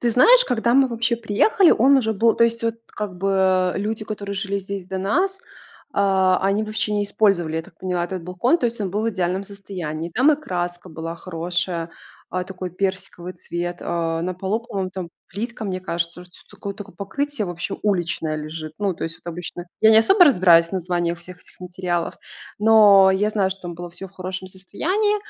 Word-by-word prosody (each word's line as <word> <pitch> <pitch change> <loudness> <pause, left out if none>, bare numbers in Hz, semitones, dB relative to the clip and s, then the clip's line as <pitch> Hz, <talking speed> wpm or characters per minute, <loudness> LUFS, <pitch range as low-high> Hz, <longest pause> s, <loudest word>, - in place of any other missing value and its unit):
Ты 240 - +1
знаешь, 485 - +6
когда 235 - +1
мы 270 0 +5
вообще 235 0 0
приехали, 235 - +3
он 275 +4 +5
уже 220 -4 +1
был, 225 +2 +3
то 230 - +4
есть 230 0 -1
вот 230 -1 0
как 205 -3 -6
бы, 190 -1 +2
люди, 215 +2 -2
которые 205 -2 -5
жили 200 0 -2
здесь 195 -1 -6
до 190 0 -4
нас, 370 - 0 0.5
а 190 -2 +3
они 195 +2 +2
вообще 215 0 -2
не 205 0 +1
использовали, 190 -6 +1
я 165 - -1
так 165 - -19
поняла, 180 -2 -1
этот 180 0 -5
балкон, 180 - +1
то 245 - +1
есть 235 -1 -5
он 195 -3 -2
был 205 +3 -1
в 230 - +1
идеальном 185 -1 -1
состоянии. 180 -5 -6
Там 260 - +4
и - - +1
краска 175 -7 -4
была 165 0 -6
хорошая, 170 0 -3 0.4
а 185 - -1
такой 185 -1 -6
персиковый 185 -1 -4
цвет, 175 0 -4
а 165 -1 -1
на 180 +1 -2
полу, 190 +5 -2
по-моему, 195 -5 -4
там 185 -3 -5 0.2
плитка, 225 +3 -5
мне 185 -2 -3
кажется, 170 -1 -3
уже 180 0 -14
что - - -16
такое 200 0 -6
такое 205 -2 -10
покрытие 280 +4 -3
вообще 175 +2 -4
уличное 175 -6 0
лежит. 155 0 -6
Ну 200 -2 0
то - - -5
есть 165 0 -5
вот 170 - -4
обычно. 175 +1 -7
Я 220 - +7
не 220 - +8
особо 375 - +6
разбираюсь 175 - +6
в - - -18
названиях 175 -2 -1
всех 180 +1 -12
этих - - -20
материалов, 180 -1 -3 0.4
но 205 -3 +7
я 205 +3 +1
знаю, 200 -3 +1
что 195 0 -6
там 175 -1 -6
было 175 +1 -7
всё 195 +3 -9
в - - -27
хорошем 185 0 -6
состоянии, 365 - -1
190 Hz, 205 wpm, -22 LUFS, 175-215 Hz, 0.5 s, не